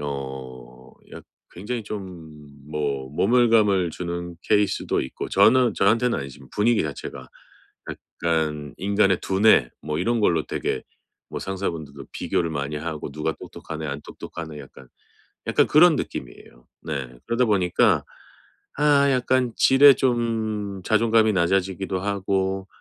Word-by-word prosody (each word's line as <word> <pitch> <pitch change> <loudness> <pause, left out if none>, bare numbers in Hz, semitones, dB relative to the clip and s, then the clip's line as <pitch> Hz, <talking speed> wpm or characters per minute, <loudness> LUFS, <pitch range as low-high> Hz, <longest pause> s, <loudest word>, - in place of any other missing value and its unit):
어 65 -3 -8 0.2
약 - - -10 0.3
굉장히 115 +5 -5
좀 90 -7 -8 0.3
뭐 70 -3 -3
모멸감을 105 - +3
주는 85 0 -5
케이스도 105 -1 +1
있고. 65 - -6
저는 130 -2 +4
저한테는 115 +5 +2
아니지만 70 -1 -10
분위기 115 +2 +2
자체가. 65 -3 -7 0.9
약간 75 -4 -1
인간의 100 -1 +2
두뇌 95 - +3
뭐 75 0 -3
이런 115 +5 0
걸로 85 -6 +2
되게 - - -3 0.5
뭐 - - -4
상사분들도 85 -7 -5
비교를 85 -1 -1
많이 70 0 -3
하고 75 -1 -5
"누가 75 +2 -2
똑똑하네 80 -1 -7
안 70 0 -5
똑똑하네." 80 -3 -9
약간 65 -1 -14 0.6
약간 - - +3
그런 160 +2 +6
느낌이에요. - - -7 0.2
네. 70 -5 -5
그러다 115 +2 +1
보니까 95 -5 +2 0.7
아 145 -1 +4
약간 130 -1 +1
지레 135 +1 +7
좀 110 -6 -1
자존감이 110 0 +3
낮아지기도 95 +1 0
하고 95 -1 -1
95 Hz, 285 characters per minute, -23 LUFS, 75-110 Hz, 0.9 s, 지레